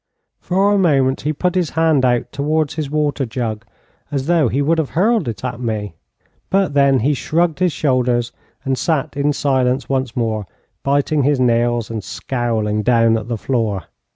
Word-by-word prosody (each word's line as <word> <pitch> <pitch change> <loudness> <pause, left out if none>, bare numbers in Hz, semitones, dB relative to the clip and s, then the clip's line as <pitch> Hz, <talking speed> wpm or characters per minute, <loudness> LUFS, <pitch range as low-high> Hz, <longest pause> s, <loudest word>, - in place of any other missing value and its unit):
For 195 +3 +1
a 200 - +3
moment 135 -7 +2
he 150 - -1
put 180 +4 -1
his 180 -4 0
hand 160 -4 +3
out 120 -1 +1
towards 150 +1 0
his 150 -2 -4
water 150 -1 0
jug, 115 -2 -4 0.4
as 135 -2 -2
though 165 -4 +3
he 125 +4 -1
would 160 +3 +2
have 155 - -1
hurled 215 - +2
it 115 +2 -5
at 125 - -4
me, 110 -6 -3 0.6
but 195 -5 +1
then 140 -3 +4
he 145 +6 +2
shrugged 165 +4 0
his 180 -1 +2
shoulders 125 -5 0 0.3
and 135 -1 0
sat 155 -5 -1
in 145 +1 +1
silence 130 -2 0
once 130 -3 -1
more, 110 -4 -2 0.3
biting 145 +2 +1
his 140 0 +2
nails, 120 -2 +1
and 110 -3 -4
scowling 110 -5 -2
down 115 0 +3
at 110 0 -3
the 120 -1 -2
floor. 105 -4 -1
135 Hz, 180 wpm, -18 LUFS, 120-155 Hz, 0.6 s, then